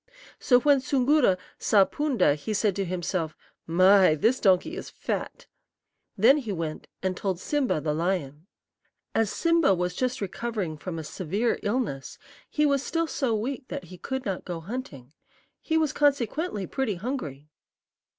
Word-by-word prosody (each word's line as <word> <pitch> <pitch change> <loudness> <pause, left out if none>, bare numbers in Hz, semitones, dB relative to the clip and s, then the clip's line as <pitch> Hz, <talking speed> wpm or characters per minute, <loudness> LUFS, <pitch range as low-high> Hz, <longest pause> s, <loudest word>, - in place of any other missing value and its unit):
"So 245 -2 +4
when 285 0 +5
Soongoora 260 -5 +3 0.2
saw 200 -3 +5
Poonda 275 - +1
he 150 +9 -4
said 205 -2 +1
to 195 - -1
himself, 175 -2 -3 0.3
'My, 185 0 +6
this 225 - +2
donkey 195 - +3
is 405 - -7
fat!' - - -4 0.7
Then 240 +9 +6
he 240 -8 -4
went 165 -4 -4 0.2
and 185 -1 0
told 190 -1 -2
Sim'ba, 280 - 0
the 150 0 -1
lion. 165 -2 -2 0.7
"As 225 -2 +2
Simba 335 - +3
was 180 0 -1
just 255 +4 -1
recovering 200 -3 -3
from 165 +2 -6
a 160 - -4
severe 195 +9 -1
illness, 205 - -2 0.3
he 300 - +1
was 280 -2 +2
still 330 +3 -1
so 265 -7 -1
weak 255 +5 -3
that - - -5
he - - -9
could 265 0 -4
not 195 -4 -3
go 175 -2 -5
hunting. 165 - -7 0.5
He 320 - 0
was 310 -3 +1
consequently 280 - 0
pretty 245 -1 -2
hungry. 160 - -5
205 Hz, 155 wpm, -26 LUFS, 175-265 Hz, 0.7 s, My